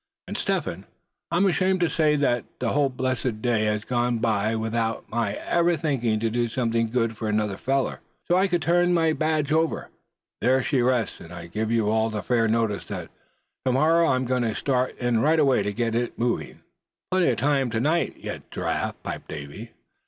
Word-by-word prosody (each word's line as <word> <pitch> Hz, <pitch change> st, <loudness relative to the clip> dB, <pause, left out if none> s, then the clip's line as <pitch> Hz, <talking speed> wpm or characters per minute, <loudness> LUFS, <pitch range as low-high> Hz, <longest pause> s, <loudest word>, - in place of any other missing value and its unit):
And -, -, -5 dB
Step -, -, 0 dB
Hen, -, -, -6 dB, 0.4 s
I'm 175 Hz, +4 st, +2 dB
ashamed 190 Hz, 0 st, +2 dB
to 175 Hz, -, +4 dB
say 155 Hz, -2 st, +2 dB
that 125 Hz, -5 st, +1 dB
the 120 Hz, -, 0 dB
whole 145 Hz, -1 st, +2 dB
blessed 130 Hz, -3 st, -2 dB
day 110 Hz, -2 st, +1 dB
has 105 Hz, 0 st, 0 dB
gone 120 Hz, -1 st, 0 dB
by 110 Hz, -1 st, +1 dB
without 110 Hz, 0 st, -2 dB
my 115 Hz, -3 st, 0 dB
ever 170 Hz, 0 st, +1 dB
thinking 125 Hz, -8 st, 0 dB
to 115 Hz, -, +1 dB
do 120 Hz, +1 st, +1 dB
something 115 Hz, -1 st, 0 dB
good 115 Hz, -1 st, 0 dB
for 110 Hz, 0 st, -3 dB
another 105 Hz, -2 st, 0 dB
feller, 135 Hz, +5 st, -1 dB, 0.3 s
so 175 Hz, -, +3 dB
I 190 Hz, +2 st, +4 dB
could 175 Hz, -4 st, 0 dB
turn 175 Hz, +3 st, +3 dB
my 165 Hz, -1 st, +3 dB
badge 155 Hz, -2 st, 0 dB
over. 160 Hz, +1 st, 0 dB, 0.5 s
There 130 Hz, +2 st, +3 dB
she 135 Hz, -2 st, +1 dB
rests; 125 Hz, -2 st, 0 dB
and 85 Hz, -, -12 dB
I 85 Hz, -1 st, -8 dB
give 110 Hz, +6 st, -3 dB
you 115 Hz, -2 st, +2 dB
all 110 Hz, 0 st, +2 dB
fair 115 Hz, -2 st, +2 dB
notice 110 Hz, -3 st, 0 dB
that -, -, -6 dB, 0.6 s
to 130 Hz, -, +3 dB
morrow 165 Hz, +5 st, +4 dB
I'm 130 Hz, 0 st, +1 dB
going 125 Hz, 0 st, 0 dB
to 115 Hz, -3 st, -1 dB
start 130 Hz, -2 st, 0 dB
in 120 Hz, -2 st, +1 dB
right 155 Hz, +6 st, +3 dB
away 135 Hz, -6 st, +4 dB
to 105 Hz, +1 st, -1 dB
get 115 Hz, +2 st, -1 dB
it 120 Hz, +1 st, -1 dB
moving." 120 Hz, 0 st, -2 dB, 0.5 s
"Plenty 185 Hz, -1 st, +3 dB
of 120 Hz, -, 0 dB
time 135 Hz, 0 st, +1 dB
to 115 Hz, -1 st, -1 dB
night 155 Hz, +7 st, 0 dB
yet, -, -, -7 dB
Giraffe," -, -, -2 dB
piped -, -, -5 dB
up 75 Hz, -, -4 dB
Davy. 75 Hz, +11 st, -8 dB
120 Hz, 200 wpm, -25 LUFS, 115-150 Hz, 0.6 s, to